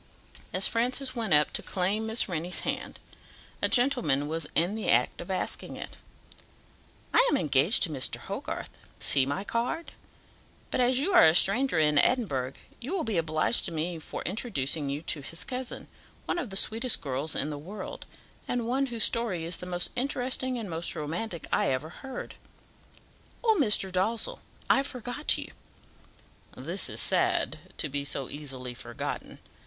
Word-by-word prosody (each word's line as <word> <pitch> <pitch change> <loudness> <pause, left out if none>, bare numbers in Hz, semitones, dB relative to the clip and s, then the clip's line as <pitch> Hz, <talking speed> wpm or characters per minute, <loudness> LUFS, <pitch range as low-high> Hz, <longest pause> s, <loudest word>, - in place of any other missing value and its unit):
As - - +3
Francis 255 +3 0
went 225 -5 -2
up 150 0 +4
to - - 0
claim 200 +4 0
Miss 220 +1 +2
Rennie's 175 -1 -1
hand, - - -4 0.6
a - - +3
gentleman 240 - +2
was 160 0 -2
in 175 +5 +2
the 220 0 -3
act - - +3
of - - -9
asking - - -2
it - - -7 1.2
"I - - +7
am 290 - +3
engaged 150 - +4
to 165 - +2
Mr. 135 -3 +1
Hogarth - - -5 0.3
see 135 -1 +4
my 160 +8 -2
card 245 +10 -2 0.8
but - - +1
as 250 +1 +3
you 310 +9 +1
are - - +8
a 160 - +4
stranger 235 +5 +4
in 150 -2 +4
Edinburgh, 140 - +2 0.3
you 260 +9 -5
will 350 - 0
be 215 -6 0
obliged 155 +6 0
to 175 - -3
me 165 +1 -2
for - - -6
introducing 160 - -1
you 145 +3 -3
to 150 - -1
his 165 +5 -4
cousin, 255 -1 -5 0.4
one - - -1
of 255 - -4
the 195 - -2
sweetest 230 +4 +2
girls 140 +1 -2
in 150 - -1
the 145 - -5
world, 190 +6 -8 0.4
and 240 -2 -1
one 270 +3 +1
whose 235 -3 0
story 215 -8 +1
is 170 +1 -1
the 180 - -8
most 175 -1 -2
interesting 255 -1 0
and 230 - -4
the 190 - -7
most 165 +1 +2
romantic 170 +4 -4
I - - +3
ever 135 +4 -1
heard. 265 +8 -7 1.1
Oh! 445 -2 +4
Mr. 210 -6 +4
Dalzell, 205 +5 0 0.3
I 270 - +5
forgot 255 +1 -1
you." - - -6 1.1
"This - - -1
is - - -3
sad, 355 - +2 0.2
to 155 - -1
be 140 0 -2
so 140 -2 -2
easily 130 -4 -6
forgotten. 120 -1 -6
190 Hz, 170 wpm, -28 LUFS, 155-245 Hz, 1.2 s, are